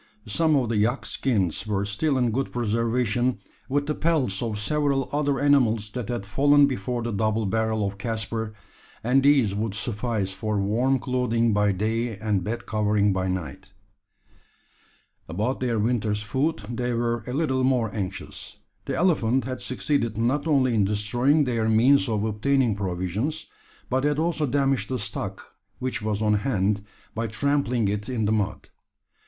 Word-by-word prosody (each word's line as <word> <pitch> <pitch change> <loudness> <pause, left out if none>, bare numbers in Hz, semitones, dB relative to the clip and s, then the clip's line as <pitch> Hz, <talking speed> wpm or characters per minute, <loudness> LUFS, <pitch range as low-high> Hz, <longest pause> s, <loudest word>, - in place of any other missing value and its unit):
Some 155 +8 +2
of 125 -5 +1
the 115 - 0
yak 115 +6 +1
skins 105 - -1
were 100 -1 0
still 130 +8 0
in 125 -2 +2
good 135 +4 -2
preservation 120 +1 0 0.3
with 145 +2 +1
the 150 - -1
pelts 145 - +1
of 110 -3 -2
several 140 +4 0
other 145 -1 0
animals 115 -7 +3
that 125 0 -5
had 120 -5 -3
fallen 145 +7 +4
before 125 -2 -2
the 115 - -2
double 110 +1 0
barrel 110 +1 0
of 100 0 -7
Caspar 110 0 -3 0.5
and 125 +4 +3
these 135 -7 +4
would 105 0 -2
suffice 105 -1 -2
for 105 0 -2
warm 120 +7 +2
clothing 120 -3 0
by 105 0 +3
day 110 +3 -1
and 105 -3 -1
bed 115 +5 -4
covering 105 -1 +1
by 95 0 -1
night. 95 +1 -5 1.6
About 105 +10 -1
their 120 -3 0
winter's 105 -2 0
food 130 +2 -1
they 120 +1 -2
were 120 0 -1
a 125 - -4
little 130 -3 0
more 125 -5 +1
anxious. 95 -3 -6 0.3
The - - -2
elephant 135 -8 +2
had 130 +1 -5
succeeded 125 -4 -1
not 130 +7 0
only 135 -5 +3
in 110 -3 +3
destroying 120 +9 +2
their 115 -4 0
means 130 +5 +4
of 105 -2 0
obtaining 115 +2 +1
provisions, 100 - -2 0.4
but 130 +1 0
had 145 0 +1
also 160 -2 0
damaged 135 -5 +1
the 130 - -1
stock 105 -2 -6 0.2
which 130 -2 -3
was 105 0 -1
on 105 0 +3
hand, 105 -4 0 0.3
by 115 +1 -2
trampling 125 -1 0
it 105 +2 -2
in 115 -4 -1
the 105 - +1
mud. 105 -2 -1
115 Hz, 160 wpm, -25 LUFS, 105-130 Hz, 1.6 s, fallen